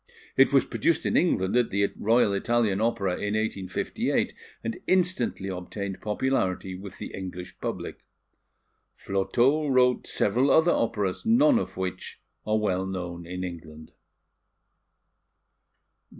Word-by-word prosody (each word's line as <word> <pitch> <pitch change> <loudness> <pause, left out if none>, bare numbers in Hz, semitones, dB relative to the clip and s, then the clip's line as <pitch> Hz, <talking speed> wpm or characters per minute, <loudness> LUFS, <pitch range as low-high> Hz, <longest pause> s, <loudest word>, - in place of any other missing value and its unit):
It - - +5
was - - +4
produced - - 0
in - - 0
England 95 +4 +2
at 125 -2 +3
the 100 +1 0
Royal 110 -1 +3
Italian 110 -1 +1
Opera 100 -4 +1
in 105 +1 -2
1858, 100 -4 -1 0.3
and 115 0 -4
instantly 185 - +1
obtained 95 +1 -5
popularity 105 -5 -1
with 95 +1 -9
the - - -7
English 90 -1 -7
public. - - -5 1.0
Flotow 125 +10 +1
wrote 125 -2 +3
several 125 +7 +2
other 160 +4 +5
operas, 105 -5 -1
none 245 +3 +5
of - - -6
which 95 -1 -5 0.3
are 110 0 +2
well 95 -3 0
known 90 -2 -5
in 90 +1 -5
England. 80 -3 -8
100 Hz, 120 wpm, -26 LUFS, 95-120 Hz, 1.0 s, It